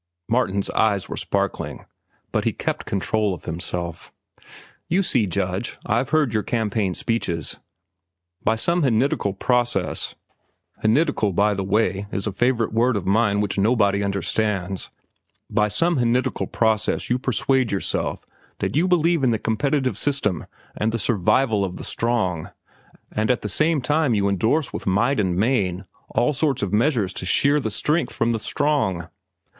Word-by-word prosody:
Martin's 100 -4 0
eyes 100 -4 +1
were - - -5
sparkling, - - -2 0.5
but - - 0
he - - +1
kept - - -3
control 100 0 0
of - - -14
himself. 85 0 -5 0.8
"You 190 +4 +2
see, 120 - +2
Judge, 95 +3 -2
I've 120 +5 0
heard 150 -7 +2
your 110 - +2
campaign 105 -5 -1
speeches. 85 -9 -2 0.8
By 110 - +2
some 170 +10 +1
henidical 115 -6 +1
process—henidical, 120 - -1
by 105 +2 +3
the 100 -1 -2
way 100 0 0
is 100 - -2
a 105 - -1
favorite 115 +2 +1
word 120 +1 +2
of 95 - -4
mine 105 +1 +2
which 100 -1 -1
nobody 100 -2 +3
understands—by 100 +1 -3
some 170 +9 +2
henidical 125 0 0
process 110 +1 0
you 125 - +2
persuade 130 -1 +1
yourself 100 - -2 0.3
that - - -2
you 165 +5 +3
believe 170 -3 +2
in 130 - +4
the 115 - +2
competitive 130 +1 0
system 120 - 0 0.3
and 110 +1 0
the 115 - -1
survival 110 +1 +2
of 90 -2 -4
the - - -7
strong, 110 -9 -1 0.6
and 110 +2 -1
at 125 - +1
the - - -1
same 155 - +2
time 145 -2 +2
you 100 -1 +2
indorse 110 - +1
with - - -5
might 115 +8 +2
and 95 -4 +1
main 100 -3 0 0.2
all 135 +5 +1
sorts 140 -4 0
of 100 - -2
measures 110 -4 +2
to - - -5
shear 140 +10 +3
the 110 - -2
strength 150 +10 0
from 115 0 +1
the 115 - -1
strong." 120 - 0
110 Hz, 150 wpm, -23 LUFS, 100-130 Hz, 0.8 s, in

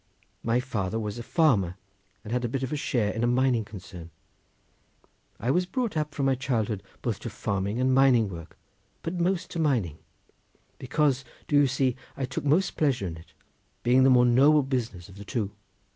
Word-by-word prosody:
My 115 +1 +1
father 110 -5 -2
was 105 +1 -4
a - - -4
farmer 120 - +2 0.5
and 110 - -5
had 125 0 0
a 120 - -1
bit 135 +2 -2
of 130 - -3
a - - +1
share 120 -7 0
in 115 - -3
a - - +3
mining 125 -1 +2
concern. 90 -5 -10 1.3
I 120 - 0
was 180 +4 +1
brought 235 +1 -2
up 150 -1 -2
from 140 - 0
my 135 - +3
childhood 115 -6 -1 0.2
both - - -1
to - - -5
farming 100 +3 -2
and 130 0 +2
mining 130 -4 +5
work, 85 -4 -9 0.5
but 165 - -3
most 175 +1 0
to 170 - -4
mining, 115 - 0 0.8
because, 135 0 +1 0.2
do 145 - 0
you 145 -1 +6
see, 130 -1 +1 0.2
I 135 - -1
took 130 - -5
most 160 +7 +2
pleasure 135 -9 +1
in 85 -3 -4
it, 80 -1 -15 0.5
being 125 +2 +4
the 135 - +6
more 125 -1 +6
noble 140 +5 +5
business 120 -10 -3
of 95 - -14
the - - -7
two. 105 -1 -3
125 Hz, 190 wpm, -27 LUFS, 105-140 Hz, 1.3 s, you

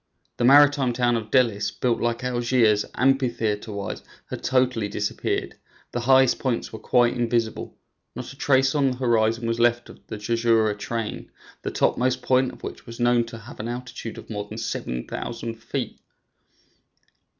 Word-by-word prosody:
The 120 - +1
maritime 140 -1 +6
town 120 0 +2
of 110 -2 -3
Dellis, 110 -6 +2
built 120 +1 -1
like 120 +1 -1
Algiers, 120 -4 +2
amphitheater 120 -5 +1
wise, 100 -1 -5 0.3
had - - -5
totally 125 -4 +1
disappeared; 105 0 -2 0.3
the 120 - -2
highest 130 +1 +4
points 125 -3 -2
were 110 - -6
quite 120 +2 +3
invisible; 115 -2 -1 0.4
not 125 +2 -7
a - - -15
trace 135 -2 +3
on 140 -3 +3
the 125 - -4
horizon 115 -2 +1
was 115 0 -1
left 120 0 +2
of - - -13
the - - -6
Jurjura 115 0 +2
chain, 115 0 -4 0.3
the - - -3
topmost 125 0 +1
point 130 +1 +2
of - - -16
which - - -8
was 115 +1 -9
known 120 -1 +3
to 115 0 -9
have 115 +5 -12
an 110 - -4
altitude 120 -1 -6
of - - -10
more 105 -2 -5
than 110 - -7
7,000 115 - -4
feet. - - -4
120 Hz, 160 wpm, -24 LUFS, 115-125 Hz, 0.4 s, maritime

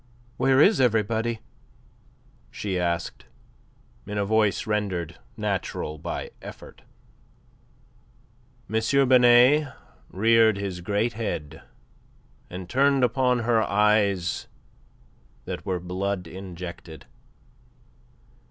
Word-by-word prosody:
"Where 135 0 +3
is 195 +2 +5
everybody?" 115 -1 +1 1.1
she 95 -3 -3
asked, 85 -1 -3 0.8
in 105 0 -4
a 100 - 0
voice 105 -1 +1
rendered 95 -6 -2 0.2
natural 95 -7 -3
by - - -5
effort. - - -11 1.9
M. 110 +1 0 0.3
Binet 125 +4 +5 0.4
reared 110 +1 +3
his 95 -3 -4
great 105 +6 -1
head 105 -9 -5 0.9
and 90 0 -7
turned 135 +3 +2
upon 125 0 +2
her 115 -1 +2
eyes 100 -3 +1 1.0
that - - -6
were 90 -2 -1
blood 90 +1 -3
injected. 85 -2 -9
105 Hz, 90 wpm, -25 LUFS, 90-115 Hz, 1.9 s, is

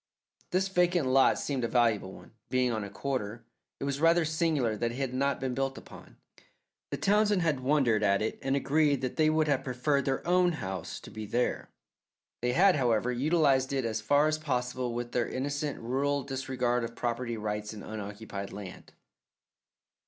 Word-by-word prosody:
This 185 +2 +1
vacant 180 -4 +2
lot 135 +1 +5
seemed 135 -4 -2
a - - +1
valuable 115 -6 +2
one, - - -13 0.2
being 125 -1 +2
on 110 -2 -2
a 100 - -6
corner. 115 0 -4 0.3
It - - -5
was 140 0 -2
rather 165 0 +4
singular 155 -8 +1
that 115 +2 -1
it - - -7
had 135 -2 -2
not 140 +1 0
been 130 -1 -2
built 135 +1 -2
upon. - - -13 0.7
The - - -3
Townsends 205 -2 +3
had 155 -5 +1
wondered 130 -5 +2
at 100 -1 +3
it 110 - -2
and 135 0 0
agreed 145 0 +2
that 130 -1 -3
they 155 -1 +4
would 155 0 +2
have 140 -2 +1
preferred 135 +2 0
their 135 -1 -1
own 180 0 +4
house 95 - -5
to - - -11
be 110 0 -7
there. 120 +4 -1 0.7
They 125 0 0
had, 185 +2 +5
however, 120 -2 +1
utilized 135 0 +2
it 135 -3 0
as 110 -1 -2
far 145 +7 +3
as 155 0 0
possible 125 -4 -2
with 120 0 -4
their 120 -1 0
innocent, 145 +2 -3
rural 140 +4 0
disregard 125 -3 -1
of 115 0 -5
property 120 0 -2
rights 105 0 -3
in 105 -2 -9
unoccupied 105 -1 -6
land. 100 -3 -9
130 Hz, 180 wpm, -29 LUFS, 115-145 Hz, 0.7 s, lot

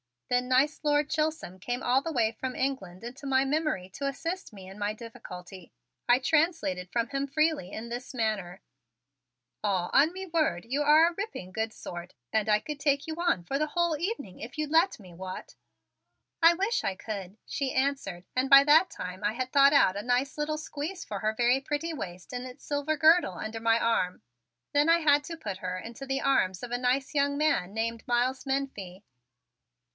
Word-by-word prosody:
Then 250 0 +2
nice 265 +4 +3
Lord 295 -1 +2
Chisholm 305 - -2
came 245 +7 -3
all 255 +2 +3
the 330 - -4
way 230 -6 +2
from 255 +3 -5
England 230 -9 -3
into 255 +4 -8
my 265 0 +3
memory 290 - -1
to 275 +9 -4
assist 330 - -4
me 190 -2 -11
in 195 +2 -11
my 205 +1 -1
difficulty. 185 -5 -10 0.3
I 245 0 +6
translated 295 - +1
from 235 +2 -1
him 275 0 -2
freely 305 - 0
in 230 +2 -6
this 245 +3 -6
manner: 210 -6 -2 1.0
"Aw, 190 -4 0
on 305 +5 +5
me 380 +1 -6
word, 310 - 0
you 275 +5 0
are 305 +2 +7
a 345 - -2
ripping 390 - -6
good 220 +2 -2
sort 175 0 -8 0.2
and 220 -1 +1
I 210 0 +3
could 300 -2 -6
take 280 -1 +1
you 320 -1 -4
on 340 - +1
for 270 +10 -2
the 305 - +1
whole 340 +1 +1
evening 340 - -4
if 240 +8 -8
you'd 305 -1 -2
let 330 0 +3
me. 185 -4 -13
What?" 185 +2 -8 0.9
"I 330 +1 +8
wish 400 +6 0
I 195 - -1
could," 195 -1 -6
she 275 -2 -2
answered 260 -10 -1
and 255 +1 0
by 275 0 +10
that 315 +6 +5
time 180 +2 -7
I 210 - +1
had 255 +2 -3
thought 280 0 +6
out 200 -9 +4
a - - -2
nice 250 +5 0
little 305 +1 -1
squeeze 310 +4 -5
for 205 - -5
her 215 +1 0
very 245 +3 +3
pretty 295 +4 -3
waist 180 - -7
in 250 0 -3
its 255 0 -11
silver 290 +1 -1
girdle 315 - +5
under 220 +5 -5
my 225 0 +3
arm. 230 -6 0 0.5
Then 290 +2 +4
I 335 +1 +6
had 290 -2 +3
to 330 +1 -6
put 205 -11 -5
her 185 -1 -4
into 235 +8 -8
the 270 +1 -1
arms 190 -9 +1
of 245 - -6
a 245 - 0
nice 255 +3 0
young 285 -1 +1
man 245 -12 +1
named 225 +1 -3
Miles 250 +2 +1
Menefee. 240 -9 -3
260 Hz, 200 wpm, -28 LUFS, 210-295 Hz, 1.0 s, by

